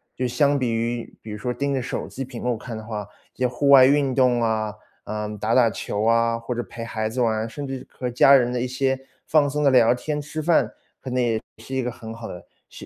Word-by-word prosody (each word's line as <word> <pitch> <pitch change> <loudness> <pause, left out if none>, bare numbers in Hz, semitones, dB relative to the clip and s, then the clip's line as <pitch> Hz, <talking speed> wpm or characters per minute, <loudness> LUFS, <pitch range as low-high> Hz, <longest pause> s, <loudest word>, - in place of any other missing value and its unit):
就 130 - -1
相 145 +3 +2
比 125 -4 0
于 115 +1 -3
比 110 - -10
如 105 - -5
说 125 +3 -3
盯 140 +3 -1
着 - - 0
手 125 - -4
机 135 - -6
屏 125 -2 -8
幕 125 -2 -1
看 115 +1 -7
的 110 - -7
话， 105 -2 -5 0.3
这 130 - -3
些 125 - +4
户 135 +3 0
外 135 -2 +9
运 140 -1 +3
动 125 -3 +3
啊， 110 -2 0 0.3
嗯， 105 0 -4
打 110 +3 -1
打 120 -2 +5
球 105 0 -3
啊， 115 +1 +2
或 115 +2 -4
者 120 - -2
陪 115 -1 -8
孩 110 -1 -2
子 125 +3 -2
玩， 110 -1 +1
甚 140 +5 -6
至 135 -1 -6
和 125 -1 -5
家 125 +3 +6
人 125 -2 +3
的 125 - -1
一 125 - -1
些 130 +1 0 0.3
放 150 -2 +4
松 150 +1 -1
地 140 - +5
聊 120 -3 +5
天 150 +4 -3
吃 150 +2 -5
饭， 165 +2 +3 1.8
可 - - -15
125 Hz, 235 characters per minute, -23 LUFS, 115-135 Hz, 1.8 s, 外